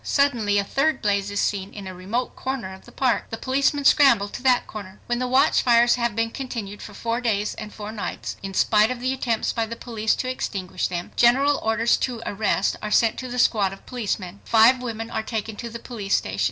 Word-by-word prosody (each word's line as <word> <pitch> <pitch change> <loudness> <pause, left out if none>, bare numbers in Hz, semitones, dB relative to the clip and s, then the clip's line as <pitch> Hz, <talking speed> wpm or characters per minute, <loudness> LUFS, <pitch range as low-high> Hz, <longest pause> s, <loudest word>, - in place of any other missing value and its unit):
Suddenly 240 -8 +2
a 200 - +2
third 290 +9 0
blaze 200 -2 0
is 205 - -2
seen 195 -1 -1
in 200 -2 -7
a 185 - -6
remote 200 +8 -3
corner 260 -8 -4
of 190 - -14
the - - -14
park. 260 -3 0
The 225 - -5
policemen 275 +3 0
scramble 240 -9 +5
to - - -7
that 250 -1 +3
corner. 200 -2 -9
When 240 0 -1
the 255 - -1
watchfires 240 -2 +4
have 235 -3 -1
been 230 0 0
continued 230 -7 -6
for 210 - -10
four 230 +3 -2
days 210 -4 0
and 215 -1 -8
four 210 0 -7
nights,, 215 -3 -5
in 195 -1 -6
spite 215 +2 +4
of 255 -1 -3
the 255 +2 -1
attempts 235 -4 -1
by 230 -1 -1
the 230 - -5
police 225 -2 -1
to 255 - -3
extinguish 195 -7 -3
them, 175 -1 -5
general 275 +4 +4
orders 225 +1 +2
to 240 -3 -3
arrest 200 -1 0
are 210 - -4
sent 225 +1 +3
to 255 - -5
the 250 0 -5
squad 205 -5 +2
of 195 - -14
policemen. 200 -6 -4
Five 235 +3 +5
women 225 -2 -5
are - - -1
taken 220 -1 -4
to 235 - -6
the 230 - -7
police 225 -4 -2
station. 95 +1 -2
225 Hz, 220 wpm, -23 LUFS, 205-250 Hz, -, scramble